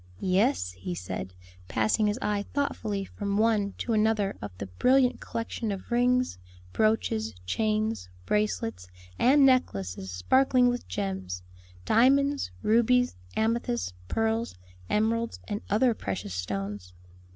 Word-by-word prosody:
"Yes," 90 Hz, -, +2 dB
he 90 Hz, -1 st, -6 dB
said, 90 Hz, +1 st, -5 dB, 0.3 s
passing 110 Hz, -, +2 dB
his 210 Hz, +2 st, 0 dB
eye 205 Hz, -1 st, 0 dB
thoughtfully 215 Hz, -8 st, -1 dB
from 200 Hz, +1 st, -3 dB
one 215 Hz, -2 st, +2 dB
to 235 Hz, -, -2 dB
another 215 Hz, -2 st, +2 dB
of 105 Hz, -, -4 dB
the 100 Hz, -, -4 dB
brilliant 250 Hz, -, +3 dB
collection 230 Hz, -1 st, -4 dB
of 195 Hz, +4 st, -7 dB
rings, 250 Hz, -, +2 dB, 0.3 s
brooches, 110 Hz, -, +1 dB
chains, 215 Hz, -, -1 dB, 0.2 s
bracelets, 115 Hz, -, -1 dB, 0.3 s
and 275 Hz, +3 st, +6 dB
necklaces 95 Hz, -, +1 dB
sparkling 250 Hz, -, +3 dB
with 245 Hz, 0 st, -3 dB
gems 90 Hz, -1 st, -4 dB, 0.4 s
diamonds, 275 Hz, +5 st, +3 dB
rubies, 245 Hz, +3 st, +3 dB, 0.2 s
amethysts, 170 Hz, -, 0 dB
pearls, 225 Hz, -, 0 dB, 0.3 s
emeralds, 230 Hz, +2 st, 0 dB
and 205 Hz, -1 st, -3 dB
other 235 Hz, +4 st, +3 dB
precious 95 Hz, -, -4 dB
stones. 100 Hz, 0 st, -4 dB
210 Hz, 120 wpm, -28 LUFS, -, 0.4 s, and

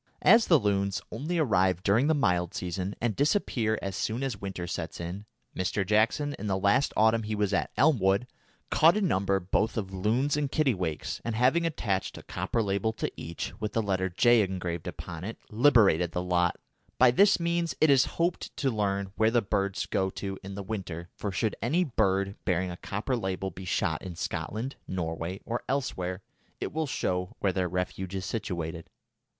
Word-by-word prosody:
As 230 Hz, 0 st, +6 dB
the 165 Hz, -, +7 dB
loons 100 Hz, -4 st, 0 dB
only 150 Hz, +10 st, -2 dB
arrive 95 Hz, -, +2 dB
during 110 Hz, +7 st, +3 dB
the 160 Hz, -, +3 dB
mild 90 Hz, -, +1 dB
season 90 Hz, +2 st, -3 dB
and 115 Hz, -3 st, 0 dB
disappear 125 Hz, -, +1 dB
as 95 Hz, -1 st, -3 dB
soon 115 Hz, +6 st, -2 dB
as 125 Hz, -7 st, -3 dB
winter 95 Hz, -3 st, -4 dB
sets 85 Hz, -2 st, -5 dB
in, 90 Hz, +5 st, -6 dB, 0.3 s
Mr. 95 Hz, +2 st, -1 dB
Jackson, 110 Hz, -, +2 dB
in 105 Hz, -, -4 dB
the 95 Hz, -1 st, +1 dB
last 100 Hz, +8 st, +3 dB
autumn 110 Hz, +1 st, +4 dB
he 105 Hz, 0 st, -3 dB
was 105 Hz, -1 st, 0 dB
at -, -, +1 dB
Elmwood, 105 Hz, -8 st, +3 dB, 0.5 s
caught 165 Hz, +5 st, +5 dB
a -, -, 0 dB
number 100 Hz, -, +1 dB
both 100 Hz, +5 st, 0 dB
of 95 Hz, -3 st, -3 dB
loons 115 Hz, +10 st, +1 dB
and 145 Hz, -2 st, -1 dB
kittiwakes, 95 Hz, -, -1 dB
and 115 Hz, -1 st, -2 dB
having 130 Hz, +9 st, +3 dB
attached 100 Hz, -, -2 dB
a -, -, -10 dB
copper 115 Hz, -, -2 dB
label 100 Hz, +2 st, 0 dB
to -, -, -3 dB
each, 85 Hz, +1 st, -5 dB
with 105 Hz, -1 st, -2 dB
the 115 Hz, -, +2 dB
letter 95 Hz, -2 st, 0 dB
J. 120 Hz, +6 st, +5 dB
engraved 90 Hz, -4 st, -3 dB
upon 85 Hz, 0 st, -7 dB
it, 110 Hz, +4 st, -5 dB
liberated 105 Hz, -, +4 dB
the 90 Hz, -, -1 dB
lot. 90 Hz, -1 st, +1 dB, 0.4 s
By 130 Hz, -1 st, +6 dB
this 195 Hz, +11 st, +5 dB
means 170 Hz, 0 st, 0 dB
it 155 Hz, -2 st, +5 dB
is 135 Hz, 0 st, +5 dB
hoped 170 Hz, +1 st, -1 dB
to 135 Hz, -3 st, +1 dB
learn 100 Hz, -3 st, -1 dB
where 110 Hz, 0 st, +4 dB
the 120 Hz, 0 st, +2 dB
birds 100 Hz, -1 st, -1 dB
go 95 Hz, 0 st, 0 dB
to 95 Hz, 0 st, -5 dB
in 95 Hz, +1 st, -7 dB
the 100 Hz, -, -5 dB
winter, 95 Hz, -5 st, -5 dB
for 100 Hz, -, -3 dB
should 105 Hz, +4 st, -1 dB
any 155 Hz, +11 st, +2 dB
bird 100 Hz, -, +1 dB
bearing 90 Hz, 0 st, 0 dB
a 85 Hz, -, -7 dB
copper 105 Hz, +8 st, -2 dB
label 95 Hz, -3 st, -2 dB
be 90 Hz, +3 st, -9 dB
shot 85 Hz, -3 st, 0 dB
in 90 Hz, -2 st, -7 dB
Scotland, 115 Hz, +9 st, -4 dB
Norway, 85 Hz, +1 st, -3 dB
or 120 Hz, +1 st, -2 dB
elsewhere, 95 Hz, -9 st, -2 dB, 0.4 s
it -, -, -4 dB
will 160 Hz, 0 st, -1 dB
show 90 Hz, -8 st, -2 dB
where 95 Hz, -2 st, 0 dB
their 90 Hz, 0 st, 0 dB
refuge 90 Hz, +1 st, -3 dB
is 95 Hz, -1 st, -3 dB
situated. 85 Hz, -5 st, -4 dB
100 Hz, 190 wpm, -28 LUFS, 95-120 Hz, 0.5 s, the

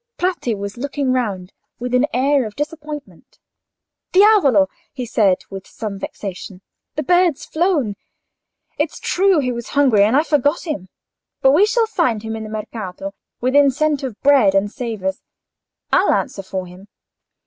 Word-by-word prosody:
Bratti 355 Hz, -11 st, -1 dB
was 200 Hz, +2 st, -6 dB
looking 280 Hz, 0 st, -1 dB
round, 200 Hz, -7 st, -2 dB, 0.2 s
with 250 Hz, +1 st, -5 dB
an 250 Hz, +3 st, +3 dB
air 270 Hz, 0 st, +2 dB
of 210 Hz, -, -11 dB
disappointment. 295 Hz, -1 st, -7 dB, 0.7 s
"Diavolo!" 365 Hz, -, +5 dB, 0.2 s
he 255 Hz, -2 st, -5 dB
said, 205 Hz, -5 st, +3 dB
with 195 Hz, -1 st, -8 dB
some 205 Hz, -3 st, -6 dB
vexation. 195 Hz, -1 st, -7 dB, 0.3 s
"The 305 Hz, -, -2 dB
bird's 355 Hz, -1 st, +2 dB
flown. 315 Hz, -, 0 dB, 0.8 s
It's -, -, -1 dB
true 385 Hz, 0 st, +2 dB
he 250 Hz, -2 st, -1 dB
was 235 Hz, -1 st, -5 dB
hungry, 260 Hz, -8 st, +5 dB
and 220 Hz, +6 st, +3 dB
I 300 Hz, -, +4 dB
forgot 295 Hz, +1 st, +1 dB
him. 195 Hz, -, -4 dB, 0.5 s
But 265 Hz, -, +6 dB
we 365 Hz, +9 st, +5 dB
shall 460 Hz, +1 st, +2 dB
find 315 Hz, -, 0 dB
him 220 Hz, 0 st, -4 dB
in 220 Hz, -, -5 dB
the 215 Hz, -, -7 dB
Mercato, 205 Hz, -3 st, -6 dB, 0.3 s
within 280 Hz, +3 st, +4 dB
scent 295 Hz, +1 st, 0 dB
of 255 Hz, -6 st, -6 dB
bread 265 Hz, -9 st, +5 dB
and 200 Hz, +1 st, +1 dB
savours, 220 Hz, -7 st, -4 dB, 0.7 s
I'll -, -, +4 dB
answer 260 Hz, -8 st, -1 dB
for 190 Hz, -1 st, -5 dB
him." 180 Hz, +3 st, -14 dB
250 Hz, 155 wpm, -19 LUFS, 205-295 Hz, 0.8 s, But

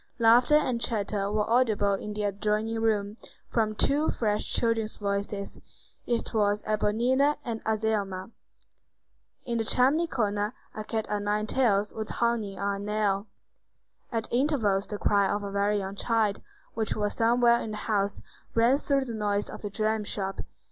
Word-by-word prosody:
Laughter 240 Hz, +5 st, +5 dB
and 255 Hz, -6 st, +1 dB
chatter 205 Hz, -3 st, -1 dB
were 210 Hz, 0 st, 0 dB
audible 220 Hz, -4 st, +2 dB
in 210 Hz, +2 st, -4 dB
the 210 Hz, 0 st, -3 dB
adjoining 210 Hz, +2 st, -1 dB
room, 210 Hz, -1 st, 0 dB, 0.3 s
from 215 Hz, -2 st, 0 dB
two 290 Hz, +7 st, +2 dB
fresh 210 Hz, -2 st, 0 dB
children's 225 Hz, -2 st, 0 dB
voices: 200 Hz, 0 st, -3 dB, 0.5 s
it 240 Hz, 0 st, -1 dB
was 205 Hz, -1 st, +1 dB
Éponine 240 Hz, +7 st, +2 dB
and 225 Hz, -2 st, -4 dB
Azelma. 215 Hz, -3 st, -1 dB, 1.1 s
In 235 Hz, -2 st, -1 dB
the -, -, +1 dB
chimney 275 Hz, +9 st, +3 dB
corner 210 Hz, -5 st, -1 dB, 0.2 s
a 215 Hz, -, -5 dB
cat 220 Hz, 0 st, -2 dB
o' 210 Hz, -, 0 dB
nine 210 Hz, +1 st, 0 dB
tails 210 Hz, -4 st, +1 dB
was 220 Hz, -1 st, -5 dB
hanging 230 Hz, -5 st, -1 dB
on 200 Hz, +1 st, -2 dB
a -, -, -6 dB
nail. 205 Hz, -1 st, 0 dB, 0.8 s
At 225 Hz, -2 st, -1 dB
intervals 240 Hz, -8 st, +1 dB
the 210 Hz, -, -4 dB
cry 200 Hz, -1 st, +2 dB
of 205 Hz, 0 st, -1 dB
a 200 Hz, -, -5 dB
very 200 Hz, +1 st, +1 dB
young 195 Hz, 0 st, -4 dB
child, 220 Hz, -2 st, 0 dB, 0.3 s
which 220 Hz, -1 st, -1 dB
was 210 Hz, -1 st, -1 dB
somewhere 235 Hz, +1 st, +4 dB
in -, -, -5 dB
the 215 Hz, -, -5 dB
house, 200 Hz, -2 st, -1 dB, 0.3 s
rang 235 Hz, +5 st, +4 dB
through 275 Hz, -2 st, +1 dB
the 235 Hz, -, -5 dB
noise 205 Hz, -1 st, -1 dB
of -, -, -9 dB
the 205 Hz, -, -4 dB
dram 215 Hz, +2 st, 0 dB
shop. 195 Hz, -1 st, -3 dB
215 Hz, 160 wpm, -27 LUFS, 205-230 Hz, 1.1 s, Laughter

